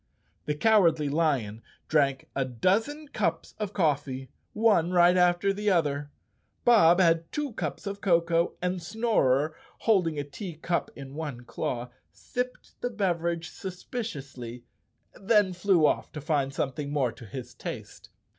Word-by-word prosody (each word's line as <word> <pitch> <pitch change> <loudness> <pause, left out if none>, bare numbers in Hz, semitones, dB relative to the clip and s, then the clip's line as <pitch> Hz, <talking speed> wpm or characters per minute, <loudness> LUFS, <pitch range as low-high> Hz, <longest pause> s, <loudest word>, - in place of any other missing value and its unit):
The 150 - 0
Cowardly 165 -6 +4
Lion 140 -9 0 0.3
drank 140 -4 +2
a 135 - +1
dozen 215 - 0
cups 165 - -2
of 210 -3 -2
coffee, 140 - -1 0.2
one 210 -6 +3
right 175 0 +5
after 180 +2 +3
the 210 +1 0
other. 145 -5 +1 0.6
Bob 190 -7 +6
had 165 -2 +3
two 295 -4 -3
cups - - -4
of 200 0 -5
cocoa, 170 -2 +2
and 180 0 -1
Snorer, 160 - +1 0.3
holding 180 -8 +2
a 145 - -1
tea 155 +5 -7
cup 170 +2 -1
in 135 -1 -9
one 145 -5 -5
claw, 120 0 -4 0.2
sipped 250 0 -6
the 245 - -1
beverage 170 -6 -1
suspiciously, 140 - -6 0.5
then 205 -2 +2
flew 180 -3 +3
off - - +1
to 155 - -5
find 145 -2 0
something 140 +1 -3
more 135 -5 +1
to 115 0 -12
his 130 +3 -7
taste. - - -8
165 Hz, 140 wpm, -28 LUFS, 140-195 Hz, 0.6 s, Bob